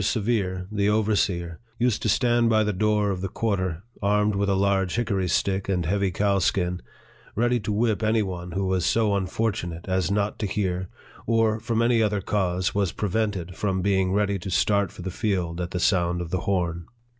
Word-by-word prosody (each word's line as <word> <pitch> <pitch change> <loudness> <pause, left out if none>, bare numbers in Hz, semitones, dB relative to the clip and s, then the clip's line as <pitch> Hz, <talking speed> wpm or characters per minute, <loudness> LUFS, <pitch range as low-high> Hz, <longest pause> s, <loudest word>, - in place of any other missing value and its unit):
Severe, 100 -4 0
the 100 -1 +1
overseer, 100 -6 0 0.2
used 120 -3 +1
to 110 - 0
stand 120 +1 +3
by 110 -1 +4
the 105 0 0
door 105 +1 +1
of 90 -2 -3
the 95 - -1
quarter, 95 -5 -2 0.2
armed 105 +1 +2
with 100 0 0
a 100 - +2
large 95 -1 +1
hickory 100 -6 0
stick 95 +2 0
and 90 -3 0
heavy 100 +3 +1
cowskin, 95 -1 0 0.5
ready 120 +2 +2
to 105 0 -3
whip 110 0 +1
any 110 0 +2
one 90 -2 -6
who 95 +1 -1
was 95 -2 0
so 110 +4 +2
unfortu 100 0 -1
nate 85 +1 -8
as 95 -2 0
not 100 +1 -1
to 105 - -1
hear, 95 -2 -2 0.4
or, 115 -1 +2
from 115 0 0
any 115 -1 +3
other 105 -2 +1
cause, 95 -2 -1
was 100 -4 0
pre 105 - -3
vented 95 -4 -2
from 95 -3 -1
being 95 -2 +2
ready 100 0 +1
to 90 - -6
start 100 0 +2
for 90 - -10
the 95 - -4
field 90 -5 -2
at 85 - -3
the 90 - -3
sound 90 -3 +2
of 85 -1 -5
the 95 - 0
horn. 85 -4 -1
100 Hz, 200 wpm, -25 LUFS, 90-105 Hz, 0.5 s, by